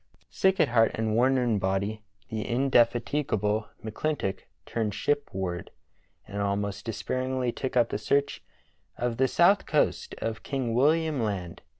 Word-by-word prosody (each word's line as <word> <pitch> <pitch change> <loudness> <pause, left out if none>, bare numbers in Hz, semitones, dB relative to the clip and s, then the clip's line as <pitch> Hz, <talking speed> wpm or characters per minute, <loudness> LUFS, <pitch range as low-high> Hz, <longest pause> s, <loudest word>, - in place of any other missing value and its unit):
Sick 190 0 +2
at 150 - +4
heart 115 -2 +4
and 110 -1 -1
worn 130 +4 +3
in 120 -5 +1
body, 95 +3 -1 0.3
the 110 -1 -2
indefatigable 120 -3 +1 0.2
McClintock 110 -2 -2 0.3
turned 110 -3 -2
shipward, 95 -12 -2 0.6
and 100 0 -4
almost 100 0 -2
despairingly 130 +3 -2
took 130 +1 -3
up 120 -1 +4
the - - -2
search 140 +6 0 0.6
of 120 -1 -1
the 130 +1 +3
south 185 +8 +4
coast 150 - 0
of 115 -1 -3
King 130 -4 -2
William 155 +2 +2
Land. 95 -6 -3
115 Hz, 135 wpm, -27 LUFS, 105-135 Hz, 0.6 s, at